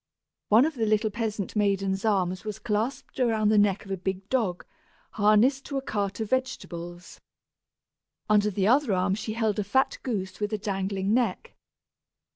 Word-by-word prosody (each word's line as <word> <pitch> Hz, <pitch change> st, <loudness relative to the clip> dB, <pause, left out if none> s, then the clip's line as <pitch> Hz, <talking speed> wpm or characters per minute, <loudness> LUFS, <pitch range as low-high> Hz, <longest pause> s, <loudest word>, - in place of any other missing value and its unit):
One 225 Hz, +6 st, +6 dB
of 320 Hz, -, -1 dB
the 225 Hz, -5 st, -1 dB
little 215 Hz, 0 st, +2 dB
peasant 215 Hz, -2 st, -3 dB
maiden's 195 Hz, -2 st, 0 dB
arms 185 Hz, -4 st, 0 dB
was 215 Hz, -2 st, -5 dB
clasped 230 Hz, +5 st, -3 dB
around 220 Hz, -4 st, +2 dB
the 215 Hz, -, +4 dB
neck 205 Hz, -1 st, +2 dB
of 195 Hz, -, -9 dB
a 195 Hz, -, -1 dB
big 190 Hz, +1 st, -4 dB
dog, 215 Hz, -9 st, -1 dB, 0.5 s
harnessed 220 Hz, +6 st, +3 dB
to 280 Hz, -, -4 dB
a -, -, -1 dB
cart 200 Hz, -4 st, -2 dB
of 220 Hz, -2 st, -4 dB
vegetables. 175 Hz, -9 st, -4 dB, 1.1 s
Under 210 Hz, 0 st, +3 dB
the 195 Hz, -1 st, -1 dB
other 250 Hz, 0 st, +3 dB
arm 185 Hz, +1 st, +1 dB
she 215 Hz, +2 st, -3 dB
held 220 Hz, -2 st, 0 dB
a -, -, +1 dB
fat 265 Hz, +7 st, +1 dB
goose 190 Hz, -7 st, -4 dB
with 210 Hz, +1 st, -2 dB
a -, -, +1 dB
dangling 195 Hz, -1 st, -2 dB
neck. 245 Hz, 0 st, 0 dB
210 Hz, 170 wpm, -27 LUFS, 195-225 Hz, 1.1 s, One